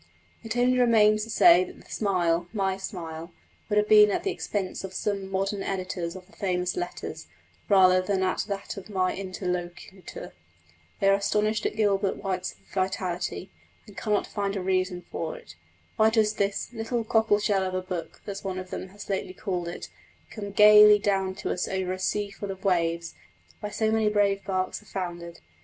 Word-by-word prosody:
It 225 +1 -4
only 250 +1 +3
remains 215 -3 +4
to - - -13
say 350 +8 +6
that 370 0 -10
the - - -16
smile 175 -4 +1
(my 195 -3 0
smile) 170 -4 -7 0.4
would 210 - +1
have 210 0 +3
been 210 -1 +7
at - - -1
the 390 - 0
expense 195 - -3
of 190 0 -7
some 200 -2 -2
modern 195 +1 -1
editors 185 -3 -3
of 185 -1 -10
the - - -24
famous 180 -2 -1
Letters, 355 0 -5 0.4
rather 185 -2 +6
than 190 0 0
at 185 - 0
that 200 0 -5
of 195 - -9
my 185 -2 0
interlocutor. 180 -1 -6 0.7
They 195 - +2
are 195 - +6
astonished 210 +2 +1
at - - -5
Gilbert 200 -2 +1
White's 185 -2 -3 0.2
vitality, 185 -1 -2 0.3
and 205 -3 -15
cannot 210 -1 0
find 200 -1 -3
a 190 - -3
reason 185 -1 -1
for 160 -1 -4
it. 85 - -14 0.4
Why 220 0 +5
does 220 -1 +2
this 200 -1 -1
"little 230 +1 -2
cockle 220 -1 +3
shell 205 -2 +1
of 185 -1 -2
a 185 - 0
book," 175 -3 -6
as 200 -1 -6
one 190 -2 -3
of 185 -1 -7
them - - -5
has 200 +2 -11
lately 190 -1 -3
called 180 -4 -3
it, 170 - -6 0.4
come 205 -2 -6
gaily 210 +1 +8
down 195 -2 0
to - - -3
us 180 - -1
over 190 -1 -2
a 185 - -6
sea 205 +2 -1
full 200 0 -7
of 190 +1 -7
waves, 170 -2 0 0.5
where 210 - -5
so 220 +1 0
many 220 -1 +2
brave 200 -1 +1
barks 185 -1 -1
have 210 - -20
foundered? 175 -2 -5
195 Hz, 185 wpm, -26 LUFS, 185-210 Hz, 0.7 s, gaily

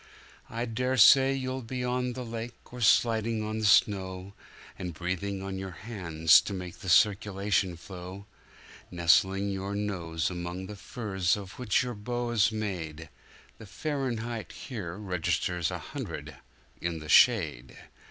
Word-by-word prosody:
I 115 +1 -3
daresay 130 +3 +5
you'll 130 0 -3
be 125 +2 -4
on 125 0 -1
the 125 0 -6
lake, 115 +1 -8
or 125 - -7
sliding 115 0 +3
on 110 +1 -3
the 110 - +1
snow, 95 -1 +2 0.5
And 90 -3 -5
breathing 95 +3 -3
on 95 -1 -4
your 95 -3 -7
hands 85 -8 +4
to 100 - -5
make 90 -2 -7
the 95 - -6
circulation 100 -1 +2
flow, 95 +2 -9 0.6
Nestling 95 +3 +3
your 100 +1 -4
nose 90 -6 -2
among 90 +1 -5
the 105 +2 -8
furs 100 -4 -1
of 100 +1 -9
which 125 -3 +2
your 125 -1 -4
boa's 120 0 0
made,—The 90 0 -7
Fahrenheit 120 -2 -3
here 100 - -6
registers 90 -3 -1
a - - -3
hundred - - -7 0.5
in 85 -1 -2
the 75 -1 -9
shade. 75 - +4
100 Hz, 135 wpm, -29 LUFS, 90-115 Hz, 0.6 s, daresay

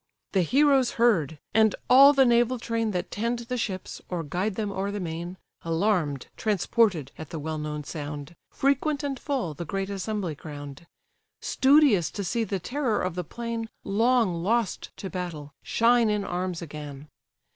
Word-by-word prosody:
The 190 - +3
heroes 270 - +3
heard, 180 - +2 0.2
and 220 -1 +4
all 275 +3 +9
the 270 -2 +4
naval 240 +1 +3
train 230 -1 -1
That 180 -2 -3
tend 235 +3 -1
the 235 +1 -4
ships, 195 -6 -4
or 175 -2 -2
guide 185 +7 -2
them 210 -1 -2
o'er 195 +1 -2
the 205 0 -3
main, 170 +1 -5 0.2
Alarm'd, 165 -5 0
transported, 205 - +1
at 155 - -7
the 165 - -5
well 155 +1 -4
known 150 0 -4
sound, 145 +1 -6
Frequent 280 +2 0
and 275 -3 -3
full, 260 - -2
the 150 - -6
great 195 +4 -3
assembly 200 -3 -3
crown'd; 145 +1 -9 0.5
Studious 265 - +4
to 200 - -5
see 210 +6 0
the 200 -3 -2
terror 245 - -1
of 185 -1 -1
the 180 +1 -3
plain, 230 +4 -5
Long 220 -4 +2
lost 225 +2 0
to 195 - -5
battle, 165 -6 -5
shine 235 0 +3
in 210 -1 0
arms 180 -2 -3
again. 150 -2 -8
195 Hz, 165 wpm, -26 LUFS, 165-235 Hz, 0.5 s, all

